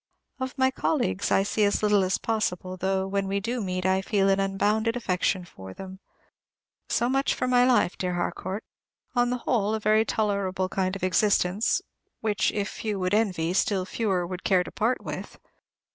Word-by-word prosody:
Of 260 +1 -4
my 260 0 +3
colleagues 250 -8 0
I 195 - +3
see 210 +2 0
as 205 +1 +1
little 210 -2 +4
as 185 0 +1
possible, 185 -5 -2
though, 190 +1 0
when 195 0 -1
we 200 +1 0
do 235 +4 -2
meet, 185 -2 -3
I 190 0 +3
feel 195 0 +1
an 195 0 +3
unbounded 210 +4 +1
affection 185 -4 0
for 95 - -11
them. 190 0 -9 0.9
So 240 - +1
much 270 +2 +1
for - - -1
my 250 0 +4
life, 245 -8 +2
dear 180 -1 -1
Harcourt; 185 +3 -3 0.5
on 245 0 +3
the 250 - 0
whole, 215 -3 +1
a - - -2
very 215 +1 +3
tolerable 200 -4 -1
kind 185 0 -1
of 195 - -7
existence, 190 +1 +2 0.4
which 215 -2 +1
if 205 -1 -2
few 210 -2 -4
would 185 0 -1
envy, 185 -6 +1
still 195 -1 +1
fewer 190 -4 -1
would 180 +1 -6
care 185 -2 +3
to - - -9
part 235 +4 0
with. - - -6
200 Hz, 185 wpm, -26 LUFS, 185-220 Hz, 0.9 s, little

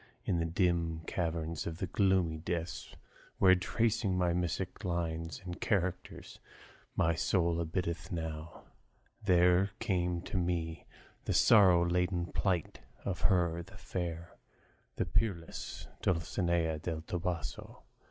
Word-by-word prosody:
In 85 - +1
the 85 - 0
dim 85 -2 +1
caverns 80 -1 -2
of 80 -1 -4
the 95 - -2
gloomy 95 -3 +2
Dis, 85 +1 -4 0.4
Where, 95 -1 +7
tracing 105 +1 +1
mystic 90 +2 -1
lines 85 -2 -2
and 90 -1 -6
characters, 95 -4 -2 0.6
My 85 - +3
soul 85 0 +1
abideth 85 0 -3
now, 80 -1 -5 0.6
there 90 0 +4
came 90 -6 0
to 95 - -3
me 85 -2 -2 0.4
The - - 0
sorrow 95 -6 +6
laden 90 0 0
plaint 90 -5 0 0.3
of 95 -3 -2
her, 85 -3 +2
the 95 +3 -13
fair, 85 -2 -5 0.6
The - - 0
peerless 90 -7 -2
Dulcinea 85 -2 0
del 80 0 -3
Toboso. 85 -5 -4
85 Hz, 115 wpm, -32 LUFS, 80-90 Hz, 0.6 s, Where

